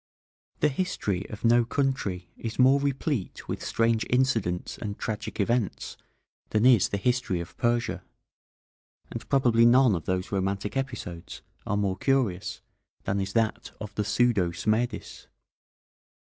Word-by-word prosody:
The 150 - +4
history 120 - -2
of 105 +1 -6
no 120 +1 +5
country 115 -9 -2
is 115 -1 -6
more 130 +2 +5
replete 140 - -2
with - - -4
strange 115 -1 +1
incidents 115 -9 0
and 105 -2 -5
tragic 110 0 -4
events 115 0 -1 0.5
than 110 +2 +2
is 120 -7 +6
the 100 - -1
history 120 -4 0
of 85 - -8
Persia, 120 0 0 1.1
and - - -7
probably 120 -4 +4
none 125 0 +6
of 85 -3 -3
those 95 0 -2
romantic 100 +2 -1
episodes 120 -11 -5 0.2
are 105 - 0
more 100 -2 0
curious 125 -10 0 0.4
than 100 +1 -1
is 95 0 -3
that 115 -1 0
of 105 -1 -7
the 105 - -1
pseudo 105 -3 +2
Smerdis. 110 +8 -2
110 Hz, 135 wpm, -27 LUFS, 95-125 Hz, 1.1 s, is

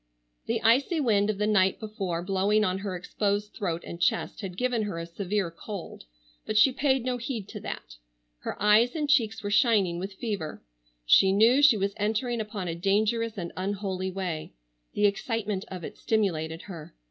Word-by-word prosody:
The - - -1
icy 270 +9 +3
wind 215 -7 +2
of 215 - -1
the 210 - 0
night 190 -3 +3
before 195 -6 -3
blowing 200 +3 +2
on 185 -1 0
her 195 -2 -4
exposed 205 +3 -2
throat 170 -4 -3
and 170 - -8
chest 225 +3 0
had 185 -3 -6
given 250 -1 0
her 205 -5 -3
a 165 - -4
severe 190 +1 -2
cold, 195 +2 -8 0.4
but 215 - -2
she 260 +5 +7
paid 265 -2 +1
no 250 -1 0
heed 235 -4 -4
to - - -7
that. - - -7 0.4
Her - - -6
eyes 215 +5 +4
and 300 -2 -1
cheeks 225 -6 +2
were 205 - -3
shining 205 -6 +3
with 190 +2 -5
fever. 200 -9 -4 0.4
She 190 - +6
knew 225 +7 +5
she 280 -6 +7
was 200 0 -1
entering 225 +3 0
upon 210 -4 -5
a 165 - -2
dangerous 215 +5 0
and 170 -3 -4
unholy 190 -1 -2
way. 180 - -4 0.4
The 205 - +3
excitement 205 -1 -1
of 185 -2 -7
it - - -8
stimulated 165 -7 -1
her. 165 - -10
205 Hz, 180 wpm, -27 LUFS, 185-225 Hz, 0.4 s, she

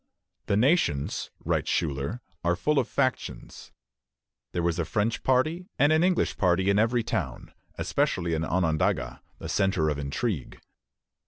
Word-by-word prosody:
"The 100 - +2
Nations," 120 - +1 0.2
writes - - 0
Schuyler, 75 - -1 0.2
"are 85 +1 +2
full 150 - +1
of - - 0
factions." 130 -2 -3 0.8
There 85 - -2
was 85 0 0
a - - +2
French 110 +6 -1
party 155 +8 +1
and 145 +2 +4
an 160 +2 +3
English 180 0 +1
party 95 +1 +3
in 100 - +3
every 115 +2 +2
town, 105 - -4 0.2
especially 85 -1 0
in 80 0 0
Onondaga, 80 -7 0 0.2
the - - -7
centre 95 -6 +1
of 75 -1 -2
intrigue. 75 - -3
95 Hz, 145 wpm, -27 LUFS, 80-125 Hz, 0.8 s, and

